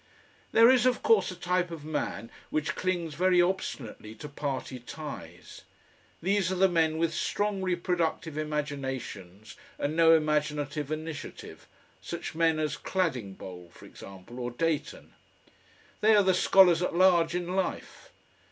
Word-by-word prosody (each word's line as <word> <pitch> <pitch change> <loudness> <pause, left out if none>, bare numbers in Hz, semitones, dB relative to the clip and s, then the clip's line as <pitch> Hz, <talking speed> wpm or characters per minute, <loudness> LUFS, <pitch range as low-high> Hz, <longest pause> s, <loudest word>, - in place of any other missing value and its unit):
There 230 +2 +7
is, 255 -1 +4
of 250 - 0
course, 455 -1 +4
a 185 - -6
type 180 0 0
of 160 -3 -8
man 150 -6 -4 0.2
which 155 0 -1
clings 175 -4 -2
very 180 +3 +3
obstinately 140 - -2
to 150 - -8
party 140 -3 -4
ties. 125 - -9 0.6
These 195 0 +1
are - - 0
the 190 +1 +4
men 160 -3 +1
with 165 0 0
strong 205 -1 -1
reproductive 175 -3 -1
imaginations 135 -10 -5 0.2
and 145 +2 -2
no 165 0 +6
imaginative 150 -1 -1
initiative, 155 -1 -7 0.3
such - - -6
men 165 -1 +2
as 155 -2 -1
Cladingbowl, 100 - -3
for - - -15
example, 100 +6 -11
or 120 -1 -3
Dayton. 155 +5 -3 0.9
They 215 +1 +5
are 205 - +5
the 190 -1 +3
scholars 180 -2 +5
at 180 - -1
large 175 -2 +4
in 180 +1 -2
life. 190 - -3
160 Hz, 140 wpm, -28 LUFS, 145-180 Hz, 0.9 s, There